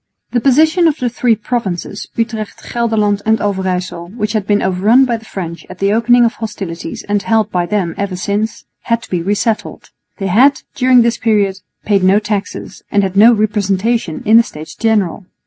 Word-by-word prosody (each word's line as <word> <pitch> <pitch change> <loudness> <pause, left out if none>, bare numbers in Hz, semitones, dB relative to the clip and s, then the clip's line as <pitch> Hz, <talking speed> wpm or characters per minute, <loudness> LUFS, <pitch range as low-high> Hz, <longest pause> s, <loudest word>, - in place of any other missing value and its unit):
The 240 - 0
position 315 +6 +4
of 310 -2 +1
the 245 -4 -2
three 240 -1 +2
provinces, 210 -4 -4
Utrecht, 225 -2 -4
Gelderland 215 -4 +1
and 220 0 +2
Overyssel, 185 -3 -2
which 210 -1 -2
had 210 -3 -2
been 205 0 +2
overrun 205 +8 +3
by 240 -2 0
the 225 - -16
French 170 -5 -6
at 185 - -10
the 200 +2 +1
opening 240 +2 +4
of 230 - 0
hostilities 195 -7 -6
and 205 0 0
held 220 +1 +1
by 175 -1 -1
them 190 -5 -1
ever 200 -2 -2
since, 205 +4 -3 0.2
had 230 -1 0
to - - -13
be 180 -2 0
re 200 +4 0
settled. 220 +1 -3 0.3
They 195 - -4
had, 250 +10 +3
during 250 -1 +4
this 235 0 0
period, 205 -4 +1 0.3
paid 200 -3 +2
no 190 +2 +5
taxes, 210 -1 -4
and 200 -1 +2
had 190 -1 -2
no 220 +4 +7
representation 210 -3 0
in 220 +2 +6
the - - +8
States 155 -6 -10
General. 205 -5 0
210 Hz, 190 wpm, -15 LUFS, 195-230 Hz, 0.3 s, the